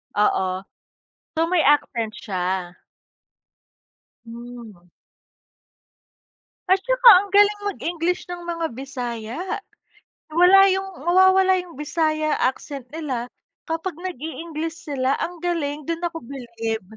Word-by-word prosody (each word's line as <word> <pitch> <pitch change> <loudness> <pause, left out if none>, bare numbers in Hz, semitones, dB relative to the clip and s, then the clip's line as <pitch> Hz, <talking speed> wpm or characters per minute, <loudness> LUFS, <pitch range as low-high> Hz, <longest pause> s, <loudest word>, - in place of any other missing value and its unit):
Oo. 190 -2 +1 0.7
So 325 - +3
may 360 -3 +3
accent 235 -6 +2
siya? 185 -2 -3 1.5
Hmm. 230 -6 -11 1.8
At 380 +1 +3
saka - - +3
ang 400 +2 +3
galing 410 0 +4
mag-English 350 0 -2
ng 350 -1 -7
mga 335 -7 -3
Bisaya. 245 -1 -5 0.9
Wala 360 +4 +7
yung 385 -5 -4
mawawala 375 +1 +5
yung 350 -5 -12
Bisaya 310 0 0
accent 265 0 -2
nila 260 -5 -4 0.4
kapag 330 +1 -4
nag-i-English 325 -1 -5
sila, 280 -6 -2
ang 350 +1 -3
galing 300 -4 -2
dun 335 +2 -3
ako 335 -6 -4
bilib. 230 -4 -5
310 Hz, 105 wpm, -22 LUFS, 240-355 Hz, 1.8 s, Wala